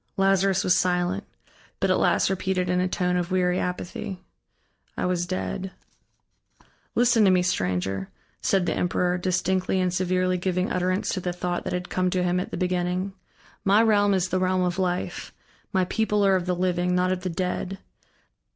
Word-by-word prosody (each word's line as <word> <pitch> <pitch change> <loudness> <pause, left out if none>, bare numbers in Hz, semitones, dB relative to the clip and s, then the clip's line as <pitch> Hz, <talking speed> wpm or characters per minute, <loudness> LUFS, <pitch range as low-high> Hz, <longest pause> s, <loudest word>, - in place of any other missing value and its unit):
Lazarus 195 0 +3
was 180 - +4
silent, 180 +2 0 0.5
but - - +2
at - - +3
last - - +2
repeated 185 -1 -1
in 180 - +1
a 185 - +1
tone 180 -1 0
of 175 -1 -2
weary 180 -1 +1
apathy: 180 +1 -4 0.8
"I - - -1
was 180 -1 0
dead." 185 +1 -3 1.2
"Listen 240 -2 +4
to 195 - +6
me, 180 -1 +4
stranger," 95 - -1 0.3
said 190 -2 +2
the - - 0
emperor, 180 0 0
distinctly 185 +1 0
and 180 -1 0
severely 185 0 +1
giving 180 0 -1
utterance 185 +1 0
to 185 - -1
the 180 -1 -3
thought 175 0 -3
that - - -3
had 180 0 -3
come 185 0 +1
to 180 0 0
him 180 0 +1
at 180 - -4
the - - -5
beginning, 180 +1 -1 0.5
"my 205 +3 +5
realm 205 -2 +4
is 185 -1 0
the 185 - 0
realm 185 0 +1
of 180 +1 -1
Life, 180 -1 -2 0.4
my 190 -3 +2
people 210 0 +1
are 195 -1 +4
of 180 -1 -1
the 180 - +1
living, 180 0 0
not 180 0 +2
of 185 -1 -1
the 185 - -3
dead. 185 +2 -3
185 Hz, 180 wpm, -25 LUFS, 180-190 Hz, 1.2 s, to